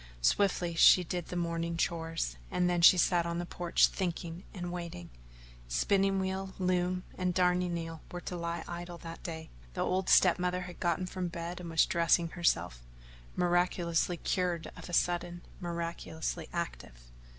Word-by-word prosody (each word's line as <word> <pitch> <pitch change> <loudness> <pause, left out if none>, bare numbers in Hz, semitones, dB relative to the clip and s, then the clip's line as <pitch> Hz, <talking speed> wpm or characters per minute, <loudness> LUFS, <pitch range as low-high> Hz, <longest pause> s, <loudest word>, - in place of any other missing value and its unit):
Swiftly 180 - +2
she 180 +2 +7
did 175 0 -4
the - - -6
morning 170 -1 -2
chores 165 - -1
and 180 - +1
then 175 -1 +1
she 175 +2 +9
sat 175 0 +3
on 170 0 -3
the 175 - -2
porch 175 0 +3
thinking 175 -1 -3
and 175 -3 -5
waiting. 170 - -6 0.6
Spinning 195 - +2
wheel, 190 0 -3
loom, 180 0 0 0.2
and 180 -1 0
darning 180 -1 +2
needle 165 -1 -5
were 175 - -5
to 180 - -5
lie 170 -1 -3
idle 175 0 -6
that 165 0 -9
day. 160 -2 -7 0.2
The - - -2
old 185 0 0
step 180 -1 +6
mother 180 0 0
had 180 -1 -9
gotten 175 +1 0
from 185 0 -3
bed 170 +1 -5
and 175 -1 -7
was 165 -1 +4
dressing 170 0 +2
herself 90 - 0 0.5
miraculously 175 -1 +1
cured 175 -2 -1
of - - -10
a - - -8
sudden, 175 0 0 0.2
miraculously 170 -2 -4
active. 165 - -5
175 Hz, 160 wpm, -31 LUFS, 170-180 Hz, 0.6 s, she